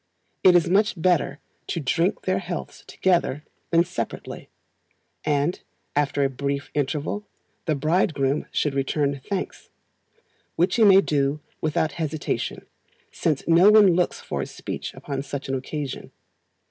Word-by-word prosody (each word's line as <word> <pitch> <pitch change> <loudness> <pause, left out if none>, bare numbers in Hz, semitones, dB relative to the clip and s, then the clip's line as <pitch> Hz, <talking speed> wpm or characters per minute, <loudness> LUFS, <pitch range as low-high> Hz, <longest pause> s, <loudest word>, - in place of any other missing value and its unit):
It 185 -1 +7
is 170 -2 +4
much 200 +1 +2
better 170 -3 +1 0.3
to 170 - -2
drink 170 +7 0
their 185 0 +1
healths 175 -2 -6
together 170 -6 +1 0.3
than 170 0 +4
separately; 180 0 -6 0.7
and, 150 +3 0 0.3
after 145 -1 +1
a 135 - +2
brief 140 +1 -3
interval, 150 +8 -2 0.4
the 155 - +1
bridegroom 150 -2 +1
should 150 - 0
return 140 0 0
thanks, 195 -2 -4 0.9
which 175 +7 +2
he 230 - +5
may 195 -2 +8
do 140 -3 0 0.2
without 155 0 0
hesitation, 155 -1 -3 0.5
since 155 -4 -1
no 170 +4 +7
one 210 -4 +7
looks 180 +1 0
for - - -4
a - - -4
speech - - -6
upon 140 -2 -4
such 140 0 -6
an 135 - -2
occasion. 135 +1 -4
155 Hz, 135 wpm, -24 LUFS, 140-180 Hz, 0.9 s, may